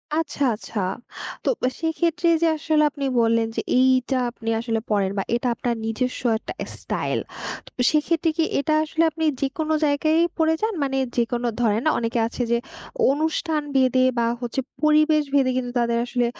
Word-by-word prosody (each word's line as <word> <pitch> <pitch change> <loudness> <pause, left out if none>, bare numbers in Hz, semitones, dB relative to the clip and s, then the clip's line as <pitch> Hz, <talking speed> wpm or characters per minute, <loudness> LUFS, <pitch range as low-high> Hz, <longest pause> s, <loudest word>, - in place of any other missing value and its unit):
আচ্ছা, 295 -3 -1
আচ্ছা। 215 0 -6 0.6
তো, - - +1 0.3
সেক্ষেত্রে 335 +1 0
যে 335 - +4
আসলে 310 0 +2
আপনি 280 -2 -4 0.2
বললেন 230 0 +2
যে, - - 0 0.2
এইটা 260 0 +3
আপনি 225 -1 -6
আসলে 225 -1 -1
পড়েন, 200 -2 +1
বা 195 - 0
এটা 245 +1 -1
আপনার 240 -1 -1
নিজস্ব 250 +3 -2 0.2
একটা - - -7
স্টাইল। - - -3 0.6
তো, - - 0
সেক্ষেত্রে 325 +2 +1
কি 325 - +3 0.2
এটা 305 +2 0
আসলে 320 +1 0
আপনি 320 +1 -4 0.2
যেকোনো 310 +3 -1
জায়গায়ই 310 +3 +2
পড়ে 320 0 +3
যান? 440 0 0
মানে 270 -1 -1 0.2
যেকোনো 240 +1 0
ধরেন 220 0 +2
অনেকে 230 0 -1
আছে 240 - -5
যে 235 - +4 0.5
অনুষ্ঠান 315 +1 0
ভেদে, 255 -1 +4
বা 235 - +2 0.2
হচ্ছে 240 +2 -2 0.2
পরিবেশ 305 0 +4
ভেদে, 270 -2 +4
কিন্তু 245 -1 -2
তাদের 235 0 +1
আসলে 245 -1 0
270 Hz, 160 wpm, -23 LUFS, 235-315 Hz, 0.6 s, যে